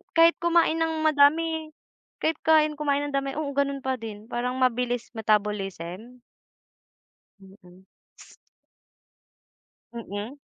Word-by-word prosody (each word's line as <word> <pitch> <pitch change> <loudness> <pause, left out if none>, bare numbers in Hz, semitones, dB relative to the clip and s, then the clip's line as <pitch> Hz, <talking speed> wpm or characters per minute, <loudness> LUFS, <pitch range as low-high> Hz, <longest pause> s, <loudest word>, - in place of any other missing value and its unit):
kahit 330 0 +6
kumain 340 -1 +3
ng 320 -1 -1
madami 315 +2 +3 0.5
Kahit 320 0 +1
kumain 310 -1 +4
kumain 285 -1 0
ng - - -9
dami, 275 0 -2
oo 300 -2 -2
gano'n 280 -1 -1
pa 260 0 0
din. 215 -2 -8
Parang 250 +1 -3
mabilis 245 -1 0
metabolism? 210 0 -2 1.2
Mm. 190 -1 -18 2.1
Mm. 230 +4 -6
265 Hz, 105 wpm, -26 LUFS, 215-310 Hz, 2.1 s, kahit